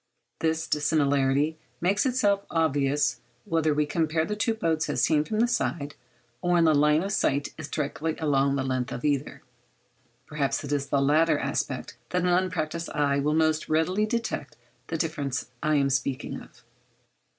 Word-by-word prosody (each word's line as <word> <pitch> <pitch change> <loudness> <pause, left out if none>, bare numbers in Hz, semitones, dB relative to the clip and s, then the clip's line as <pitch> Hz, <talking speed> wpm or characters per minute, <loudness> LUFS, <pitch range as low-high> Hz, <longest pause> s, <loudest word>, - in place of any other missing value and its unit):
This 160 0 0
dissimilarity 145 0 +1 0.2
makes 195 +8 +2
itself 205 -6 +2
obvious 145 -4 +1 0.3
whether 160 -1 +1
we 150 0 +2
compare 160 +1 0
the 210 - -3
two 225 +2 0
boats 160 -6 0
as 120 - 0
seen 150 +2 +3
from 215 +6 -1
the 240 - +4
side, 145 - -1 0.5
or 175 - +1
when 170 -1 +4
the 160 -1 +5
line 150 +2 +4
of 200 - -3
sight 140 -6 0
is 155 -2 -7
directed 155 +1 -2
along 140 -3 +2
the 135 - -1
length 130 -2 -2
of 125 - -5
either. 140 -2 -1 0.8
Perhaps 150 -1 -1
it 145 - -6
is 145 -1 0
in - - -20
the 140 - +2
latter 155 +2 +3
aspect - - -3
that 180 -1 0
an 180 - +2
unpractised 170 -2 0
eye 140 -1 +2
will 150 +2 +1
most 155 -1 +1
readily 180 +7 +1
detect 230 - -3 0.3
the 165 - -2
difference 145 -6 -3
I 155 0 +2
am 140 -1 +2
speaking 130 +1 -2
of. - - -17
155 Hz, 175 wpm, -26 LUFS, 140-165 Hz, 0.8 s, the